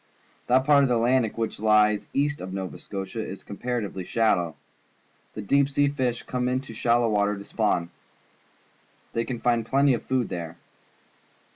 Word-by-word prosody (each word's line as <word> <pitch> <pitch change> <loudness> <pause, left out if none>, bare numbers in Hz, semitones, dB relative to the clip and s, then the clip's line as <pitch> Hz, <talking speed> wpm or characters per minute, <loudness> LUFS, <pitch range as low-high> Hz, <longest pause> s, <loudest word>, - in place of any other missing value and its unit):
That 130 +1 +3
part 145 -1 +6
of 135 - +2
the 125 - +3
Atlantic 120 -1 +2
Ocean 115 - -5
which 110 - -3
lies 105 -1 +3
east 145 +1 0
of 95 - -6
Nova 95 -1 -5
Scotia 100 +2 -5
is 95 - -8
comparatively 105 -3 -4
shallow. 90 -6 +1 0.8
The 105 - -5
deep 140 +6 +3
sea 145 0 +2
fish 130 -4 -2
come 125 -1 -2
into 130 -1 -3
shal 120 +2 +2
low 115 - +2
water 105 -1 +1
to 100 - -8
spawn. 90 -6 -1 1.2
They 115 0 -1
can 125 -3 -4
find 120 -1 +1
plenty 135 +4 +3
of 120 - -2
food 130 -4 -1
there. 85 -1 -6
115 Hz, 170 wpm, -25 LUFS, 100-130 Hz, 1.2 s, part